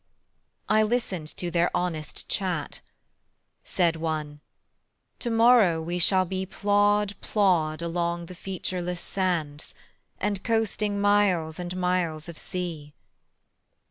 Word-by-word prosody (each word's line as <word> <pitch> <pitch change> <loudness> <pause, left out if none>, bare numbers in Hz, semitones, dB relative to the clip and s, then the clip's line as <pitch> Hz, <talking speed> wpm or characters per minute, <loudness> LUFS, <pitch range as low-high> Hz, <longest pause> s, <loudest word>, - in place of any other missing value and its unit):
I 215 0 +4
listened 215 -8 -1
to 175 -1 -2
their 175 0 +2
honest 160 -4 -3
chat: 180 -5 -2 0.8
Said 170 -2 +1
one: 155 -2 -3 0.8
"To 240 - -2
morrow 225 -7 +5
we 170 +2 -3
shall 185 +2 +4
be 185 +1 -3
Plod 205 +1 +2
plod 170 -6 +1
along 170 0 -2
the 180 - -10
featureless 180 -1 -4
sands, 165 -7 -2 0.4
And 205 -1 -1
coasting 215 -3 0
miles 195 -6 +2
and 180 +1 -4
miles 180 -4 -1
of 170 -2 -8
sea." 165 -5 -5
180 Hz, 110 wpm, -26 LUFS, 165-205 Hz, 0.8 s, morrow